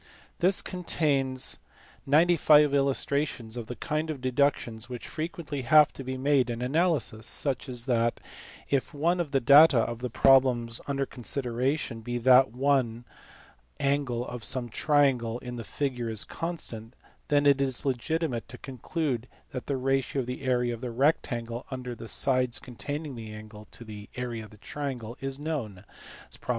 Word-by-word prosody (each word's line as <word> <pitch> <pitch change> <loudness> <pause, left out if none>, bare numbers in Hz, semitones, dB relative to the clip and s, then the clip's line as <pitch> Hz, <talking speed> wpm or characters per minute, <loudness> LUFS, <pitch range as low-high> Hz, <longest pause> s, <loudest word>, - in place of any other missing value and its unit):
This 185 +1 +4
contains 135 - 0 0.5
95 150 -1 +5
illustrations 140 -3 0
of 120 -2 -6
the 125 - -6
kind 155 +2 -2
of 150 -3 -4
deductions 130 -3 0
which 125 -2 -7
frequently 155 -3 -4
have 150 +4 +5
to 135 - -8
be 130 0 -4
made 135 -1 +2
in 115 -1 -3
analysis; 130 - 0
such 135 -2 -1
as 120 -2 -3
that, 115 -2 +1 0.5
if 140 +1 -1
one 170 +5 +1
of 170 -4 -1
the 140 -1 +2
data 140 +2 +7
of 115 0 0
the 125 0 -3
problem 130 -1 +4 0.2
under 140 -1 -1
consideration 125 0 -2
be 120 +2 -3
that 130 +1 +5
one 125 -2 0 0.7
angle 135 -4 0
of 120 -2 -7
some 120 0 +1
triangle 130 -4 +2
in 125 0 -7
the 115 - -5
figure 125 +1 -3
is 110 -2 0
constant, 130 -9 -5 0.3
then 145 -2 +2
it 140 -1 +5
is 130 -2 0
legitimate 135 0 -1
to 125 - -8
conclude 130 -1 -3 0.2
that 125 - -6
the 140 - -1
ratio 135 +1 0
of - - -5
the 125 +1 -5
area 125 -2 +1
of 115 - -8
the 125 - -4
rectangle 120 -2 -1
under 130 -2 -5
the 115 -1 -9
sides 125 0 +1
containing 145 +4 -5
the 115 -3 -8
angle 105 0 -10
to - - -9
the 105 -2 -10
area 120 -3 -4
of 105 - -12
the 105 - -16
triangle 125 -2 -5
is 135 0 -3
known 130 -12 -4 0.6
(prop. - - -17
130 Hz, 165 wpm, -28 LUFS, 120-145 Hz, 0.7 s, data